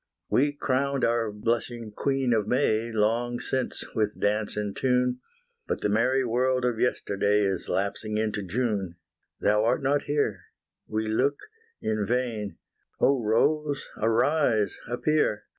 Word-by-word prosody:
We 145 +3 +3
crowned 140 -1 0
our 115 -2 +1
blushing 115 +1 -2
Queen 135 +2 0
of 105 -2 +1
May 115 -2 +1
Long 115 +3 +1
since, 130 -1 -2
with 105 -1 -1
dance 105 +1 0
and 105 -1 -2
tune, 125 -1 +1 0.5
But - - -2
the - - +1
merry 125 +5 +2
world 125 +2 +1
of 120 -2 0
yesterday 105 -3 +1
Is 95 -2 -1
lapsing 105 +2 -1
into 110 -1 -1
June 100 -3 -2 0.5
Thou 105 +1 +3
art 125 +5 +1
not 145 +2 +1
here, 130 - -1 0.4
we 110 0 -2
look 130 +6 +1 0.5
in 110 -1 0
vain 115 -3 -2 0.4
Oh 135 -2 +3
Rose 145 +7 +1
arise, 115 -1 +2
appear! 125 -2 +1
115 Hz, 135 wpm, -27 LUFS, 105-130 Hz, 0.5 s, We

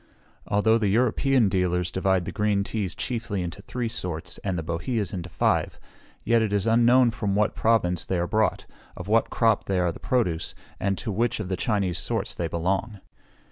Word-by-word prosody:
Although 110 +3 +3
the 105 - +1
European 125 +3 +3
dealers 90 -2 0
divide 95 -1 +1
the - - -4
green 105 -1 +1
teas 100 -3 -3
chiefly 110 -6 -3
into 90 +3 -6
three 120 +3 -3
sorts, 90 -5 -5
and 95 -3 -2
the 80 - -3
boheas 90 +5 -2
into 90 -2 -5
five, - - 0 0.4
yet 115 0 +3
it 110 -2 0
is 100 -1 +1
unknown 120 +2 +5
from 105 -3 -2
what 105 +1 +2
province 95 -7 +1
they 95 - -2
are 85 - 0
brought, 110 +4 0 0.3
of 90 - -7
what 115 +2 +2
crop 115 -3 +2
they 95 - 0
are 90 -1 +1
the - - -11
produce, 100 -11 -1 0.2
and 100 -1 0
to 110 - -4
which 115 +4 0
of 100 -4 -4
the 95 - 0
Chinese 95 -4 -1
sorts - - -2
they 85 - -2
belong. 95 +6 -2
100 Hz, 190 wpm, -25 LUFS, 90-115 Hz, 0.4 s, unknown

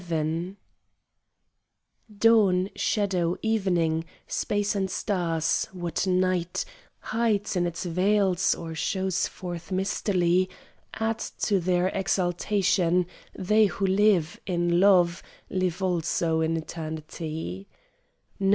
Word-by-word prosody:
XI 165 +3 -2 1.6
Dawn, 200 -4 +4
shadow, 185 -5 0
evening, 175 -7 +1 0.2
space 205 0 -1
and 190 -1 0
stars; 170 -6 0
what 175 0 -2
night 185 -1 0 0.4
Hides 215 -3 0
in 175 -1 +1
its 170 +2 -5
veils 190 +1 +2
or 165 -1 -7
shows 190 +3 -1
forth 175 0 -7
mistily, 185 -1 +1 0.5
Add 225 0 -1 0.2
to 200 -2 +2
their 180 +1 +1
exaltation; 180 -1 +1 0.3
they 210 +3 +4
who 195 +1 -2
live 190 -4 +2
In 175 -1 +1
love, 180 -3 +4 0.3
live 185 0 -1
also 170 -2 0
in 160 +1 +1
eternity. 155 - -6
180 Hz, 95 wpm, -26 LUFS, 170-195 Hz, 1.6 s, Dawn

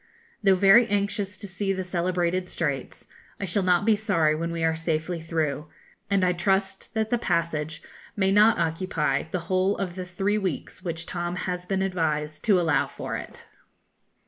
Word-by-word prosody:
Though 195 -2 +5
very 200 +5 +6
anxious 200 -1 -1
to 205 - -8
see 195 +1 -2
the 190 0 -3
celebrated 180 0 -1
Straits, 145 -7 -3 0.3
I 200 - -2
shall 195 +2 0
not 180 +1 +2
be 220 -1 +5
sorry 190 -8 +2
when 165 +2 -2
we 165 -1 -3
are 160 0 +2
safely 165 +1 -2
through, 155 -3 -2 0.4
and 200 -2 +2
I 180 0 +3
trust 195 +3 -1
that 220 0 0
the 240 - +2
passage 160 -5 -1 0.3
may 190 -1 +2
not 210 +3 +5
occupy 165 -1 0
the 180 +1 -2
whole 185 +3 +1
of 190 -3 -3
the 185 0 -5
three 195 +4 0
weeks 185 -2 -4
which 165 -2 -4
Tom 175 0 -3
has 180 -1 -4
been 190 0 0
advised 155 -5 -1
to 200 -4 +5
allow 160 -5 +2
for - - -5
it. - - -8
180 Hz, 175 wpm, -26 LUFS, 165-195 Hz, 0.4 s, very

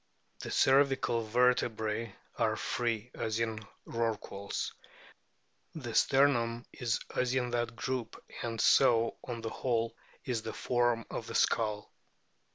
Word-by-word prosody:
The - - -6
cervical 135 -3 +3
vertebrae 115 -2 +1 0.2
are - - +1
free, 120 -1 -2
as 110 0 -2
in 115 -1 -1 0.3
Rorquals; 110 -3 -3 1.0
the 120 -7 -5
sternum 120 -4 +3
is 120 -2 -1 0.2
as 125 0 +1
in 125 -2 0
that 120 -1 -1
group; 125 -2 -3 0.2
and 115 -1 -3
so 115 0 +4
on 120 -2 -5
the 115 0 -4
whole 115 -2 -1 0.3
is 125 -5 -1
the 110 0 -5
form 120 -2 +1
of - - -4
the - - -6
skull. 105 -2 +1
115 Hz, 125 wpm, -32 LUFS, 115-125 Hz, 1.0 s, so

